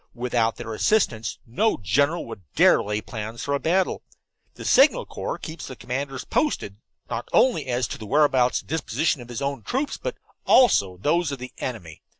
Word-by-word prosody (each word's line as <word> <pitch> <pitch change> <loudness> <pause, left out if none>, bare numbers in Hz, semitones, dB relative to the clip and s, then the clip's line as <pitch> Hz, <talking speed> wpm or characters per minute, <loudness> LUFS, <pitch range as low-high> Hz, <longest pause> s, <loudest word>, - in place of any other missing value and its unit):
Without 120 -2 0
their 115 -2 -6
assistance 115 - +1
no 210 - +1
general 140 - +1
would 115 -4 -9
dare - - +6
lay 105 +1 -2
plans 110 +1 -6
for 140 - -1
a 140 - +1
battle. 180 +5 +1 0.5
The - - -9
Signal 305 - +5
Corps - - -5
keeps 160 0 -8
the 130 - -8
commanders 135 +1 -4
posted, 105 - -1 0.3
not 115 - -5
only 230 - +3
as 125 0 0
to - - -6
the 110 - -8
whereabouts 130 -2 +3
and - - -26
disposition 160 -2 -1
of 120 - -12
his 120 +2 -4
own 140 0 -2
troops, 270 +4 -2
but - - -4 0.3
also 100 - +4
of 90 - -21
those 170 +1 +2
of 140 - -4
the 125 0 -9
enemy. 90 -11 -6
130 Hz, 185 wpm, -24 LUFS, 115-160 Hz, 0.5 s, dare